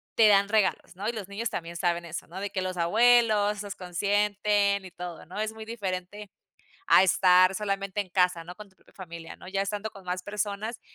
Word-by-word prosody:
te 225 - +6
dan 200 -1 +5
regalos, 210 -3 0
¿no? 200 +3 -5
Y - - 0
los 210 -5 -6
niños 205 +3 -3
también 170 0 -6
saben 170 0 -1
eso, 170 0 -6
¿no? 180 +3 -8
De 200 0 -4
que 195 -2 -2
los 185 -1 -4
abuelos 210 +2 +3
los 205 -1 -6
consienten 200 +2 +1
y 185 - -10
todo, 175 -1 -8
¿no? 180 +5 -8
Es 215 0 -2
muy 220 0 -9
diferente 205 -2 -5 0.6
a - - +7
estar 185 0 +5
solamente 195 0 -2
en 200 - -5
casa, 180 -2 +1
¿no? 175 +2 -9
Con 210 +1 -12
tu 190 - -30
propia - - -26
familia, 170 -3 -9
¿no? - - -14
Ya 195 +1 -2
estando 205 +2 -3
con 195 -3 -14
más 180 0 -3
personas, 210 +3 -4
195 Hz, 215 wpm, -27 LUFS, 180-210 Hz, 0.6 s, a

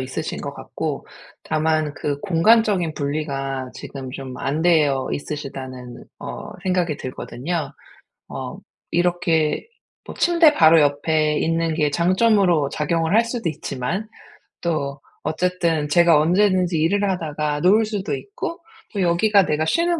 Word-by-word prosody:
있으신 130 0 -4
것 - - -5
같고 - - -5 0.4
다만 155 -1 0
그 145 -2 -3
'공간적인 195 -2 +3
분리가 135 -3 -3
지금 135 -2 -8
좀 130 -1 -7
안 150 +4 -1
되어 150 -6 +3
있으시다.'는 130 -4 -6
어 - - -7
생각이 180 -5 0
들거든요. 140 +4 -4 0.6
어 - - -6 0.3
이렇게 170 - +1 0.4
뭐 - - -9
침대 335 -3 +4
바로 160 - +6
옆에 150 +1 +1
있는 165 0 0
게 150 -2 +2
장점으로 180 -3 +3
작용을 160 +3 -1
할 230 - +5
수도 230 -5 -3
있지만 155 - -4 0.5
또 145 -4 -2 0.2
어쨌든 165 -2 0
제가 170 0 +5
언제든지 180 +1 +2
일을 200 +6 +2
하다가 150 -4 -2
누울 215 +5 +4
수도 205 -2 -3
있고 400 -4 -6 0.3
또 200 - -1
여기가 190 +3 +3
내가 155 +1 0
쉬는 335 - +1
160 Hz, 275 characters per minute, -22 LUFS, 145-185 Hz, 0.6 s, 바로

